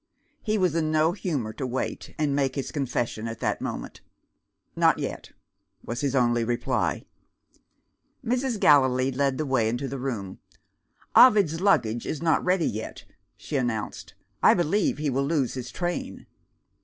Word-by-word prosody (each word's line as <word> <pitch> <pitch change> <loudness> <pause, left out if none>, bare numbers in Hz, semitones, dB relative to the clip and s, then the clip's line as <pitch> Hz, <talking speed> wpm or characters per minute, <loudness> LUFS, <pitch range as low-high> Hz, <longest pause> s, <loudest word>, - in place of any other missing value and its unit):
He 215 -1 0
was 180 -5 +2
in 160 -2 0
no 155 +1 +3
humour 150 - -3
to 130 - -4
wait, 130 +1 -4
and 150 -2 0
make 135 -2 0
his 135 - -3
confession 120 -5 -2
at 115 0 -6
that - - -1
moment. - - -6 0.7
"Not - - +4
yet," - - -5 0.6
was 115 +2 -4
his 140 -2 0
only 120 -2 +2
reply. 120 +1 -1 1.2
Mrs. 250 -1 -1
Gallilee 130 -3 +4
led 135 0 0
the 155 - -2
way 125 -5 +1
into 120 +4 -2
the 135 +1 -5
room. 110 -8 -4 0.8
"Ovid's 200 -10 +6
luggage 120 - +2
is 155 - -3
not 160 -1 +1
ready 180 -2 +2
yet," 110 +1 -6 0.3
she 145 - -4
announced; 120 -5 -3 0.3
"I - - +6
believe 175 +4 +1
he 150 -1 -1
will 135 +2 0
lose 145 -6 0
his 125 -2 -6
train." 175 -1 -4
140 Hz, 155 wpm, -26 LUFS, 120-165 Hz, 1.2 s, Ovid's